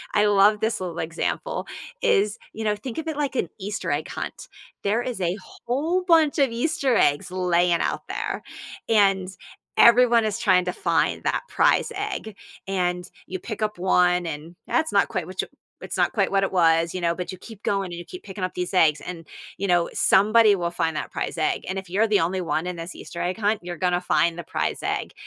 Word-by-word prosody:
I 210 Hz, -, +4 dB
love 205 Hz, +1 st, +5 dB
this 220 Hz, +1 st, 0 dB
little 175 Hz, -2 st, -4 dB
example; 165 Hz, -, -3 dB, 0.4 s
is, 205 Hz, +3 st, +2 dB, 0.2 s
you 220 Hz, -, -5 dB
know, 210 Hz, -1 st, +2 dB
think 225 Hz, +3 st, -7 dB
of 320 Hz, -, -6 dB
it 315 Hz, -2 st, -3 dB
like 285 Hz, -3 st, -1 dB
an 175 Hz, -, 0 dB
Easter 200 Hz, -3 st, -4 dB
egg 145 Hz, +2 st, -1 dB
hunt. -, -, -6 dB, 0.4 s
There 215 Hz, +4 st, +1 dB
is 245 Hz, -4 st, -4 dB
a 175 Hz, +2 st, 0 dB
whole 320 Hz, +9 st, -2 dB
bunch 325 Hz, -4 st, +4 dB
of 275 Hz, -4 st, +3 dB
Easter 270 Hz, +1 st, 0 dB
eggs 145 Hz, -2 st, +2 dB
laying 175 Hz, -2 st, +2 dB
out -, -, -2 dB
there, -, -, -3 dB, 0.5 s
and 195 Hz, -4 st, +3 dB, 0.5 s
everyone 235 Hz, -1 st, +6 dB
is 215 Hz, -1 st, -1 dB
trying 185 Hz, -6 st, +3 dB
to 180 Hz, -, -2 dB
find -, -, 0 dB
that -, -, 0 dB
prize -, -, +2 dB
egg, 390 Hz, -, -4 dB, 0.3 s
and 180 Hz, -2 st, -1 dB, 0.2 s
you 185 Hz, -, -5 dB
pick 215 Hz, +2 st, -7 dB
up 210 Hz, -3 st, -2 dB
1, 180 Hz, -1 st, +3 dB
and 160 Hz, +3 st, -7 dB
that's 315 Hz, -, +1 dB
not -, -, +4 dB
quite -, -, -2 dB
what -, -, -3 dB
you -, -, -7 dB, 0.3 s
it's -, -, -5 dB
not -, -, +2 dB
quite -, -, +1 dB
what 195 Hz, 0 st, +2 dB
it 195 Hz, -, -1 dB
was, 165 Hz, -2 st, +3 dB
you 185 Hz, -, -3 dB
know, 170 Hz, 0 st, +1 dB
but 180 Hz, 0 st, -5 dB
you -, -, -8 dB
keep 215 Hz, +2 st, -12 dB
going 195 Hz, -1 st, 0 dB
and 170 Hz, -, -6 dB
you 175 Hz, -, -9 dB
keep 365 Hz, -, -10 dB
picking 190 Hz, -1 st, -7 dB
up 185 Hz, -, -6 dB
these 180 Hz, +2 st, -3 dB
eggs 155 Hz, -5 st, +4 dB
and, 165 Hz, -3 st, -8 dB, 0.3 s
you 200 Hz, -, -2 dB
know, 175 Hz, -2 st, +2 dB
somebody 215 Hz, +1 st, +5 dB
will 175 Hz, -2 st, -2 dB
find 165 Hz, -2 st, -1 dB
that -, -, -4 dB
prize -, -, -4 dB
egg -, -, 0 dB
and 190 Hz, -, -2 dB
if 190 Hz, -2 st, -11 dB
you're 205 Hz, +5 st, +2 dB
the 210 Hz, -4 st, +3 dB
only 180 Hz, +3 st, 0 dB
one 165 Hz, -1 st, -1 dB
in 180 Hz, -1 st, -4 dB
this 165 Hz, +2 st, -7 dB
Easter 170 Hz, -, -7 dB
egg 180 Hz, +3 st, -2 dB
hunt, 215 Hz, 0 st, +1 dB
you're 175 Hz, -1 st, -6 dB
gonna 180 Hz, 0 st, +1 dB
find 170 Hz, -1 st, +1 dB
the -, -, -5 dB
prize -, -, -2 dB
egg. -, -, -2 dB
190 Hz, 220 wpm, -24 LUFS, 175-225 Hz, 0.5 s, everyone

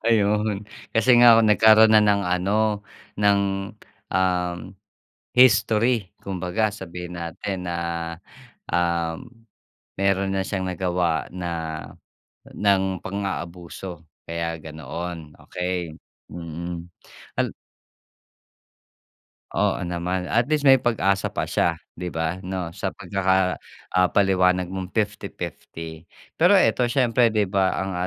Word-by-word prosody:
Ayun, 105 Hz, -2 st, +2 dB, 0.3 s
kasi 115 Hz, +3 st, +3 dB
nga 120 Hz, -2 st, +8 dB
nagkaroon 110 Hz, 0 st, +6 dB
na 110 Hz, -, +7 dB
ng 100 Hz, -1 st, +3 dB
ano 100 Hz, +4 st, 0 dB, 0.3 s
ng 100 Hz, -1 st, +4 dB, 0.7 s
um, 90 Hz, -1 st, +1 dB, 0.8 s
history 115 Hz, -3 st, +4 dB
kumbaga 95 Hz, +3 st, -1 dB
sabihin 90 Hz, -3 st, -7 dB
natin 90 Hz, +2 st, -5 dB
na, 85 Hz, -, -2 dB, 0.9 s
um, 85 Hz, +2 st, 0 dB, 0.8 s
meron 100 Hz, 0 st, +1 dB
na 95 Hz, -, 0 dB
siyang 95 Hz, -2 st, -2 dB
nagawa 90 Hz, -2 st, 0 dB
na 90 Hz, -1 st, -4 dB, 1.0 s
ng 95 Hz, -2 st, +1 dB
pang-aabuso 90 Hz, -2 st, -5 dB, 0.2 s
kaya 85 Hz, 0 st, -3 dB
ganoon 80 Hz, +1 st, -7 dB
okey. 90 Hz, -3 st, -3 dB, 0.3 s
Mm. 85 Hz, +1 st, -6 dB, 0.5 s
Ala -, -, +1 dB, 2.0 s
Oo -, -, +1 dB
naman, 90 Hz, +1 st, -2 dB
at 120 Hz, +1 st, +3 dB
least 155 Hz, -1 st, +1 dB
may 135 Hz, -1 st, +7 dB
pag-asa 100 Hz, -5 st, +1 dB
pa -, -, -3 dB
siya -, -, +1 dB, 0.2 s
'di 90 Hz, 0 st, -3 dB
ba 80 Hz, +1 st, -2 dB
'no 90 Hz, -2 st, -4 dB
sa -, -, -3 dB
pagkaka 95 Hz, -1 st, 0 dB, 0.3 s
ah 90 Hz, 0 st, +4 dB
paliwanag 90 Hz, -2 st, +3 dB
mong 95 Hz, -1 st, -6 dB
50-50 85 Hz, -6 st, -5 dB, 0.3 s
Pero 180 Hz, +5 st, +6 dB
eto 125 Hz, -9 st, +3 dB
siyempre 120 Hz, -2 st, +3 dB
di 105 Hz, -2 st, +1 dB
ba 95 Hz, -1 st, +1 dB
ang 95 Hz, 0 st, -2 dB
95 Hz, 105 wpm, -24 LUFS, 85-105 Hz, 2.0 s, nga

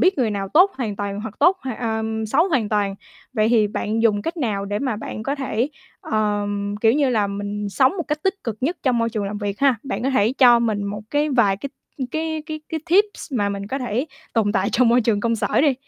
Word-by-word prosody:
biết 370 Hz, -2 st, +3 dB
người 240 Hz, -4 st, +2 dB
nào 200 Hz, -1 st, -3 dB
tốt 360 Hz, -, +5 dB
hoàn 220 Hz, -6 st, -3 dB
toàn 200 Hz, 0 st, -3 dB
hoặc 215 Hz, -1 st, -6 dB
tốt, 370 Hz, +2 st, +5 dB
hoặc 260 Hz, -3 st, -4 dB
ờm, 220 Hz, -1 st, -2 dB
xấu 285 Hz, -, +2 dB
hoàn 255 Hz, -, +1 dB
toàn. 205 Hz, -2 st, 0 dB, 0.4 s
Vậy 215 Hz, -3 st, +2 dB
thì 225 Hz, -3 st, +4 dB
bạn 215 Hz, +2 st, -2 dB
dùng 205 Hz, -3 st, +3 dB
cách 340 Hz, +2 st, -3 dB
nào 215 Hz, -9 st, -1 dB
để 205 Hz, +1 st, -2 dB
mà 255 Hz, -4 st, -1 dB
bạn 215 Hz, 0 st, -6 dB
có 275 Hz, -, -1 dB
thể, 260 Hz, -3 st, -1 dB, 0.3 s
ờm, 205 Hz, -1 st, -1 dB
kiểu 225 Hz, 0 st, +5 dB
như 285 Hz, +1 st, +2 dB
là, 215 Hz, -4 st, +2 dB
mình 205 Hz, +1 st, -4 dB
sống 260 Hz, +8 st, +3 dB
một 345 Hz, -, -1 dB
cách 300 Hz, 0 st, -2 dB
tích 385 Hz, +2 st, +1 dB
cực 230 Hz, -3 st, -3 dB
nhất 320 Hz, +8 st, 0 dB
trong 250 Hz, -3 st, +2 dB
môi 230 Hz, 0 st, +1 dB
trường 215 Hz, -3 st, -2 dB
làm 205 Hz, +1 st, -4 dB
việc 205 Hz, -1 st, -4 dB
ha? 275 Hz, -2 st, +5 dB
Bạn 270 Hz, -, -4 dB
có 265 Hz, -, +1 dB
thể 225 Hz, -3 st, +2 dB
cho 245 Hz, -3 st, +7 dB
mình 215 Hz, -3 st, 0 dB
một 205 Hz, +1 st, -4 dB
cái 295 Hz, +1 st, +1 dB
vài 225 Hz, -7 st, +3 dB
cái 275 Hz, +7 st, -6 dB, 0.4 s
cái 315 Hz, +1 st, -2 dB
cái 310 Hz, -1 st, -5 dB
cái 320 Hz, -, -3 dB
tips 405 Hz, -4 st, +2 dB
mà 205 Hz, -5 st, +1 dB
mình 200 Hz, 0 st, -4 dB
có 265 Hz, +6 st, -3 dB
thể 250 Hz, +1 st, -2 dB, 0.3 s
tồn 215 Hz, -3 st, +1 dB
tại 190 Hz, 0 st, +1 dB
trong 250 Hz, -1 st, +4 dB
môi 240 Hz, +2 st, +5 dB
trường 215 Hz, -3 st, +1 dB
công 230 Hz, +1 st, +1 dB
sở -, -, +1 dB
đi. 285 Hz, -2 st, +3 dB
225 Hz, 250 wpm, -22 LUFS, 205-270 Hz, 0.4 s, cho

